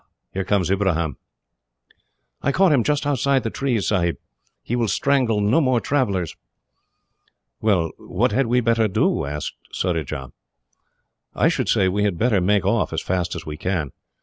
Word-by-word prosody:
here 95 - -1
comes 95 -3 +1
Ibrahim." 85 -7 0 1.3
"I 140 - +1
caught 190 +2 +4
him 135 -6 +3
just 150 +1 0
outside 140 -1 +1
the 115 - -2
trees, 125 -7 -1
Sahib. 85 -4 +1 0.5
He 120 - -2
will 120 -2 +1
strangle 125 -3 +1
no 110 +10 +3
more 130 -4 +2
travellers." 100 - -1 1.3
"Well, 90 -7 +2
what 120 +8 0
had 135 -1 +1
we 125 +2 +2
better 115 -1 +2
do?" 100 -7 +1
asked 75 +1 -4 0.2
Surajah. 75 -7 -2 1.0
"I - - +3
should - - -1
say 95 - +3
we 100 +3 0
had 100 -4 0
better 110 -3 +2
make 100 +1 +2
off, - - +1
as - - -3
fast 90 -1 -1
as 85 -2 -7
we 75 -1 -6
can. 80 -5 -2
105 Hz, 160 wpm, -22 LUFS, 90-125 Hz, 1.3 s, caught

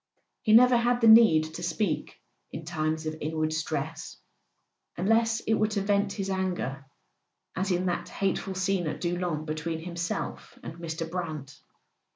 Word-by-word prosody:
He 215 - +1
never 250 +2 +7
had 240 +1 +2
the 230 - +4
need 220 -8 +8
to 170 - -7
speak 175 0 -2 0.3
in 160 - -7
times 155 -1 -2
of 155 0 -3
inward 155 +1 -1
stress, 160 0 -4 0.8
unless 225 +5 +2
it 220 - 0
were 215 -1 +2
to 210 -2 -2
vent 200 0 +1
his 195 -2 -3
anger—as 140 - -5
in 180 +1 0
that 175 -1 -2
hateful 195 -1 -2
scene 190 -2 0
at - - -4
Doullens 175 -3 -2
between 160 +1 -3
himself 170 +1 -5
and - - -6
Mr. 165 -1 -4
Brant. 155 -5 -6
175 Hz, 150 wpm, -28 LUFS, 155-200 Hz, 0.8 s, need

